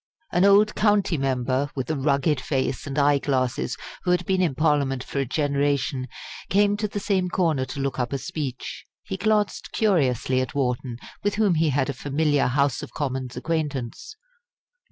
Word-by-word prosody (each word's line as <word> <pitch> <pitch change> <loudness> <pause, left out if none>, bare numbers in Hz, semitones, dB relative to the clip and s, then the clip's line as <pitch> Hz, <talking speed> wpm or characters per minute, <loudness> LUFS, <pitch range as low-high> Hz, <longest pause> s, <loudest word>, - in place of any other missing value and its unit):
An 180 +2 +3
old 205 +2 +5
county 205 -4 +2
member, 135 0 0
with 130 -2 -3
a - - 0
rugged 140 +1 +1
face 130 0 -2
and 140 +1 -4
eye 145 0 +4
glasses, 130 -3 -1 0.2
who 180 - -3
had 180 0 +2
been 190 -1 +1
in 165 -7 +1
Parliament 140 -4 +1
for 140 - -4
a 135 - 0
generation, 140 -1 0 0.4
came 205 +2 +3
to 210 0 -1
the 205 - -4
same 190 -3 0
corner 160 -8 +1
to 140 - -7
look 135 -1 -2
up 125 -1 -1
a 140 - 0
speech. 140 -5 -5 0.2
He - - -4
glanced 210 - 0
curiously 130 - +2
at 130 - -4
Wharton, 125 -3 -1 0.3
with 205 0 +1
whom 210 -3 +3
he 160 -1 +2
had 135 -1 +1
a 140 - -2
familiar 145 +2 +1
House 140 0 +1
of - - -9
Commons 130 -3 -3
acquaintance. 150 - -3
145 Hz, 175 wpm, -24 LUFS, 130-180 Hz, 0.4 s, old